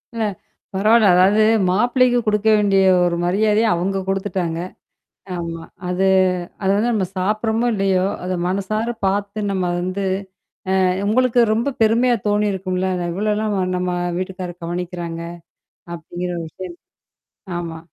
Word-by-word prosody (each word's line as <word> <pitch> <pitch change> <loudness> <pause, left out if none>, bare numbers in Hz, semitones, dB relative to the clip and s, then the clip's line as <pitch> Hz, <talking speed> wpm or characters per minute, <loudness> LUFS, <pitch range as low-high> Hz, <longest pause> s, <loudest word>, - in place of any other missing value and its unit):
அ - - -4 0.6
பரவால்ல. 215 +3 +4
அதாவது 200 +4 +5 0.3
மாப்பிள்ளைக்கு 245 +5 +3
குடுக்க 210 0 +1
வேண்டிய 200 -2 +3 0.2
ஒரு 170 -1 0
மரியாதைய 210 +4 +2
அவுங்க 190 +3 -1
குடுத்துட்டாங்க. 190 -4 -2 0.8
ஆமா. 165 -1 -5 0.2
அது 180 +2 0 0.6
அது 190 - +2
வந்து 230 +4 +1
நம்ம 210 -4 +1
சாப்புட்றமோ! 220 +5 0
இல்லயோ! 190 -1 +1 0.2
அத 185 - -2
மனசார 215 +5 -1
பார்த்து 200 +2 -1
நம்ம 190 -2 -1 0.2
வந்து 185 +2 -3 0.8
அ - - +3 0.3
உங்களுக்கு 250 +1 +3
ரொம்ப 240 +5 0
பெருமையா 235 +3 +3
தோணியிருக்கும்ல 190 -3 0
அத 175 -1 -2
இவ்ளல்லாம் 210 +2 -1 0.2
நம்ம 180 0 -2 0.3
வீட்டுக்கார 185 -1 -4
கவனிக்கிறாங்க! 175 -1 -4 0.7
அப்பிடிங்கிற 175 +2 -5
ஒரு 165 - -4
விஷயம். 180 0 -8 0.8
ஆமா. 165 -1 -6
195 Hz, 120 wpm, -20 LUFS, 180-215 Hz, 0.8 s, அதாவது